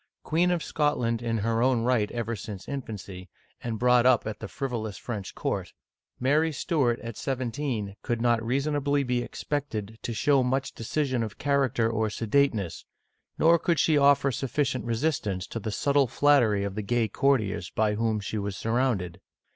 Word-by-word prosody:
Queen 170 +3 +2
of 175 -2 0
Scotland 125 -7 0
in 115 -1 -1
her 115 +2 0
own 125 -2 +2
right 115 -4 +2
ever 115 -1 -3
since 100 -1 -8
infancy, 100 -9 -6 0.3
and 115 -2 -3
brought 125 +1 +4
up 125 -2 +4
at 110 -1 -5
the - - -6
frivolous 115 -7 -4
French 105 -6 -6
court, - - -3 0.5
Mary 150 +5 +2
Stuart, 135 -4 0
at 115 -3 -7
seventeen, 125 -5 -3
could 120 -2 -2
not 120 -1 +2
reasonably 140 +3 0
be 125 -1 0
expected 110 -6 -4
to - - -4
show 135 +5 +3
much 130 +1 -1
decision 130 +1 -1
of 110 -4 -4
character 135 -5 +1
or 110 -1 0
sedateness, 110 - 0 0.5
nor 165 +1 +5
could 170 0 +1
she 155 +2 +3
offer 140 -1 +4
sufficient 130 0 -1
resistance 115 - -1
to 115 - -5
the 110 - -4
subtle 140 +5 +2
flattery 120 -6 +3
of 100 -1 -3
the 105 - -3
gay 115 +2 +1
courtiers 110 -7 +1
by 110 -1 +1
whom 110 0 0
she 105 +1 -4
was 100 -1 -4
surrounded. 115 -7 -1
120 Hz, 165 wpm, -27 LUFS, 110-140 Hz, 0.5 s, nor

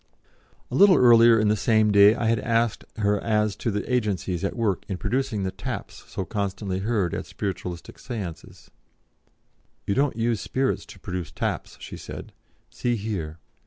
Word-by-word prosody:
A - - -2
little 200 -2 +7
earlier 115 -2 +7
in 105 - +2
the 105 - +3
same 110 0 +3
day 100 +1 +7
I 120 - -2
had 115 0 +2
asked 115 -2 0
her 105 -1 +1
as 105 -2 +1
to - - -2
the 105 -1 -2
agencies 100 -6 -1
at 100 - -2
work 110 -6 0
in 95 - -3
producing 120 -3 -1
the 95 - -1
taps - - -7
so 95 - -4
constantly 100 -2 -3
heard 100 -4 0
at - - -4
Spiritualistic 90 -3 -5
Séances. 105 -10 -7 1.2
"You 100 - 0
don't 140 +2 +1
use 115 -1 0
spirits 135 0 -1
to - - -13
produce 90 -2 -5
taps," - - -3
she - - -8
said; - - -9 0.4
"see 120 -1 -1
here." 100 -8 -4
105 Hz, 165 wpm, -25 LUFS, 95-115 Hz, 1.2 s, little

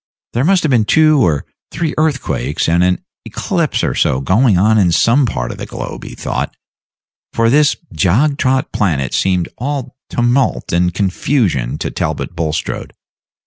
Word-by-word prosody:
There 120 - 0
must 185 +3 +3
have 155 - +1
been 115 -4 +3
two 155 0 +4
or 75 -7 +1 0.2
three 160 0 -2
earthquakes 150 - -1
and 85 +2 +3
an 90 0 +1 0.2
eclipse - - -2
or - - 0
so 65 - +1
going 100 - +3
on 110 +4 +4
in 90 -4 +3
some 120 - +3
part - - -3
of - - -9
the - - -6
globe, - - -7
he - - -9
thought, - - -4 0.8
for 115 0 +2
this 145 +1 +4 0.2
jog 110 - +2
trot 130 0 +1
planet 75 - 0
seemed 90 -3 +1
all 135 0 -4
tumult 120 +2 0
and 90 +1 +2
confusion 95 - 0
to - - -4
Talbot 85 - -3
Bulstrode. 80 -2 -3
110 Hz, 160 wpm, -16 LUFS, 85-135 Hz, 0.8 s, two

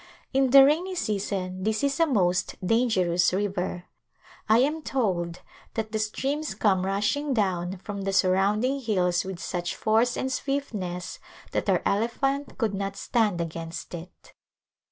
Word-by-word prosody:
In 265 0 +3
the 270 +1 +9
rainy 345 +6 +1
season 195 - -2
this 220 +4 0
is 280 +1 +1
a 330 - +4
most 185 - +1
danger 225 -5 +2
ous 175 -1 +3
river. 185 -2 -2 0.6
I 220 - +6
am 295 +6 +2
told 180 - -1 0.3
that 220 -1 -3
the 220 - -1
streams 275 +8 -2
come 190 -3 +2
rushing 250 +9 0
down 185 -3 0
from 200 +2 -6
the 195 0 -1
surrounding 200 +8 +2
hills 180 -7 +1
with 190 -1 -6
such 175 -1 -3
force 225 +3 +2
and 260 - -2
swiftness 210 -11 -3 0.3
that - - -1
our - - +2
elephant 270 +7 0
could 220 -4 0
not 195 0 -3
stand 215 -7 +1
against 165 +1 -6
it. 170 +1 -10
205 Hz, 150 wpm, -26 LUFS, 185-260 Hz, 0.6 s, the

